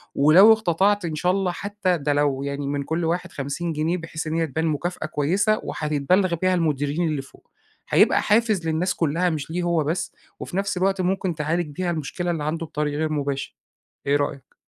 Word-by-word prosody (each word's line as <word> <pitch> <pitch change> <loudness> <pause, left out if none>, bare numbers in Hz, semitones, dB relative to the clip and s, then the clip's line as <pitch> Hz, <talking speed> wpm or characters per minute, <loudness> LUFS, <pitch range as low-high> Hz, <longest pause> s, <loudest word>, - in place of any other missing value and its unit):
ولو 175 +10 +7
اقتطعت 205 -1 +1
إن 160 -2 -3
شاء 180 +4 +1
الله 190 -1 0
حتى 195 -1 -1
ده 145 0 0
لو 145 -2 +1
يعني 140 0 -3
من 140 0 -2
كل 165 +3 -2
واحد 175 +2 -2
50 145 +5 -3
جنيه، 160 +4 0
بحيث 160 -1 -6
إن 155 - -2
هي 165 -1 +1
تبان 160 +4 -2
مكافأة 160 +2 -2
كويسة، 185 +9 +1
وحتتبلغ 165 +5 +1
بيها 185 +2 +1
المديرين 155 0 0
اللي 150 -3 -1
فوق، 135 - -19 0.4
هيبقى - - +4
حافز 210 -5 +2
للناس 165 +4 0
كلها 165 +3 +1
مش 155 -2 -4
ليه 175 +2 -2
هو 170 -3 +1
بس، 160 +5 -2 0.3
وفي 180 - -5
نفس 195 -1 -1
الوقت 190 +1 +1
ممكن 185 -1 -1
تعالج 160 +3 -1
بيها 180 +1 -1
المشكلة 170 +3 -3
اللي 160 -3 -3
عنده 165 +2 -2
بطريق 150 -1 -2
غير 155 0 -1
مباشر. 140 -2 -3 0.5
إيه 140 - +3
رأيك؟ 145 -1 -3
165 Hz, 190 wpm, -23 LUFS, 150-180 Hz, 0.5 s, ولو